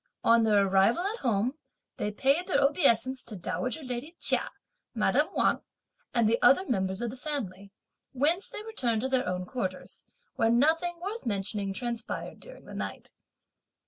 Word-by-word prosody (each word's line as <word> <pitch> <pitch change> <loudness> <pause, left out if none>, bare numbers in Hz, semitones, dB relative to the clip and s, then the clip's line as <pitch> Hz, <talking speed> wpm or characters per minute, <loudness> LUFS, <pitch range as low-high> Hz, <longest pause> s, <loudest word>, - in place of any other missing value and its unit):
On 230 0 +5
their 205 -2 +4
arrival 195 - +3
at 430 +4 -2
home, 240 +5 0 0.4
they 210 - -1
paid 275 - +1
their 375 - +2
obeisance 260 -3 +3
to 220 - -7
dowager 250 - -3
lady 255 +6 -5
Chia, - - +2 0.5
madame - - +2
Wang - - +2 0.5
and 235 -2 +3
the 230 +2 +2
other 275 +10 +6
members 190 - -1
of 235 - -2
the - - -8
family, 210 -9 -5 0.4
whence 310 +9 +1
they 420 - -7
returned 245 - -1
to 265 - -1
their 260 -5 +1
own 180 0 -2
quarters, 185 -4 -4 0.3
where 225 -3 +3
nothing 325 +8 +2
worth 400 - -5
mentioning 200 -1 -2
transpired 235 +3 -4
during - - -13
the - - -10
night. - - -6
245 Hz, 160 wpm, -29 LUFS, 210-295 Hz, 0.5 s, other